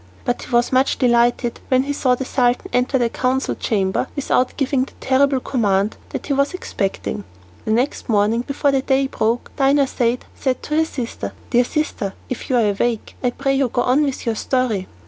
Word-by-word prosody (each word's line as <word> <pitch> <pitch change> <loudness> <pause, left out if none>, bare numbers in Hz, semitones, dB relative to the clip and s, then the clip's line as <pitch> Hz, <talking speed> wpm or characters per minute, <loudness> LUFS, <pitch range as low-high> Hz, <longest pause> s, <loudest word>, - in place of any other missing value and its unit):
But 245 - -1
he - - -9
was 240 -1 +2
much 260 +1 +2
delighted 240 -1 +2
when 255 0 +3
he 285 +1 -2
saw 255 -3 +2
the 265 - -4
Sultan 245 -2 +1
enter 250 +2 +2
the 240 -2 +2
council 255 +3 0
chamber 195 +1 0
without 260 -3 0
giving 275 -2 +1
the - - -17
terrible 270 0 +2
command 205 -5 0
that - - -5
he 285 - 0
was 280 +5 +1
expecting. 195 - -3 0.4
The 215 - -1
next 245 +4 0
morning, 215 +2 +2
before 280 +2 0
the 270 -1 +2
day 270 0 +2
broke, 235 -2 -1
Dinarzade 270 -3 +2
said 260 -2 -2
to 300 - -1
her 320 - +4
sister, 250 -7 -5 0.2
"Dear 245 -1 +4
sister, 245 -10 -2
if 255 - -5
you 260 - +2
are 215 -3 +3
awake 225 +2 -2
I 250 - +3
pray 275 +2 -1
you 270 -1 +2
to - - -15
go 245 - +2
on 255 +4 +3
with 275 -3 -2
your 230 - +1
story." 225 -4 -1
255 Hz, 200 wpm, -20 LUFS, 235-270 Hz, 0.4 s, her